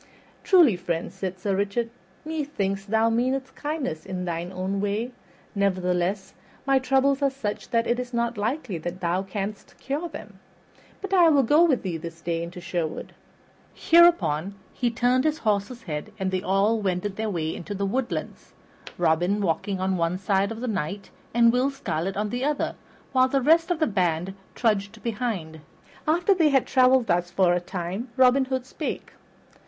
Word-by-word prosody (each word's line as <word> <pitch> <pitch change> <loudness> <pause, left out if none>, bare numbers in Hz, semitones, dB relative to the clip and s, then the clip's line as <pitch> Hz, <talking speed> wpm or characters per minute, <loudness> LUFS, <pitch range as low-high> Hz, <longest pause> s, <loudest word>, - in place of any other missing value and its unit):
"Truly, 340 - +6
friend," 175 -1 -3
said 190 -1 -4
Sir 195 +1 -1
Richard, 205 +4 -1 0.3
"methinks 280 -12 -2
thou 220 +2 +2
meanest 260 +3 0
kindness 290 - -3
in 185 -1 -4
thine 170 +1 -3
own 190 +1 -2
way; 210 +4 -1 0.4
nevertheless 185 -1 0 0.3
my 270 -1 +4
troubles 270 +2 +2
are 280 - +3
such 245 -6 -5
that 230 0 +1
it 240 +1 0
is 250 0 -5
not 235 -1 -1
likely 220 - -2
that 175 +3 -5
thou 175 +1 0
canst 195 +1 -6
cure 295 +6 -3
them. - - -10 0.6
But 395 -1 -5
I 350 -3 +6
will 285 -3 +4
go 295 +7 +5
with 275 -7 +1
thee 180 -4 -2
this 165 +1 -8
day 165 0 -2
into 170 +1 -7
Sherwood." 170 -3 -4 0.6
Hereupon 200 - +4 0.2
he 245 - 0
turned 245 +2 +2
his 310 0 +1
horse's 215 -1 -1
head, 150 -4 -5
and 190 -2 -2
they 185 -1 -1
all 200 +4 +2
wended 190 +1 -1
their 220 +1 -2
way 160 -4 -2
to 205 +4 -6
the 200 +1 -1
woodlands, 245 +5 -3 0.4
Robin 175 +4 +2
walking 195 +1 -1
on 190 0 0
one 170 +1 0
side 195 +2 +1
of 225 +1 -6
the 250 - -3
Knight 195 -1 -3 0.2
and 235 0 +5
Will 255 +2 +2
Scarlet 195 - -3
on 210 0 -1
the 245 +1 -2
other, 295 +1 0 0.4
while 255 -1 +4
the 275 +1 +1
rest 325 +6 +4
of 350 - +1
the 315 - +2
band 180 - 0 0.2
trudged 215 -1 0
behind. 210 -9 -3 0.5
After 345 +5 +3
they 330 -5 +3
had 270 -3 +3
traveled 255 -1 +4
thus 175 -2 +1
for 180 -1 +3
a 175 - +2
time 180 +6 -5
Robin 260 +1 +5
Hood 260 -1 -2
spake. 295 +3 -5
205 Hz, 175 wpm, -25 LUFS, 185-260 Hz, 0.6 s, Truly